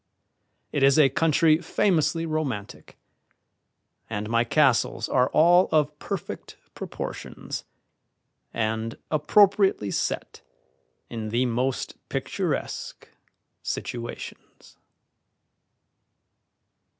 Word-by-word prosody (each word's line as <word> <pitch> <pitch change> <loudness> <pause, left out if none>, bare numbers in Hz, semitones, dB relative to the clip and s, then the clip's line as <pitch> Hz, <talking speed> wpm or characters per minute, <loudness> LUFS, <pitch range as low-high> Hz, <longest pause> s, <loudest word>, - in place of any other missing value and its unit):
It 145 - -1
is 135 +1 +5
a 145 -3 +6
country 155 +2 +3
famously 165 -2 +1
romantic, 145 -10 -4 1.1
and 105 -1 -3
my 115 0 +3
castles 120 -3 +2
are 125 -1 +2
all 175 +3 +5
of 150 -1 +1
perfect 195 -5 -6 0.2
proportions - - -6 0.9
and 110 0 -2
appropriately 190 - +3
set - - -3 0.7
in 110 -2 -5
the 120 +4 +1
most 125 +2 -2
picturesque - - -3 0.5
situations. 120 -1 -7
140 Hz, 80 wpm, -25 LUFS, 115-160 Hz, 1.1 s, a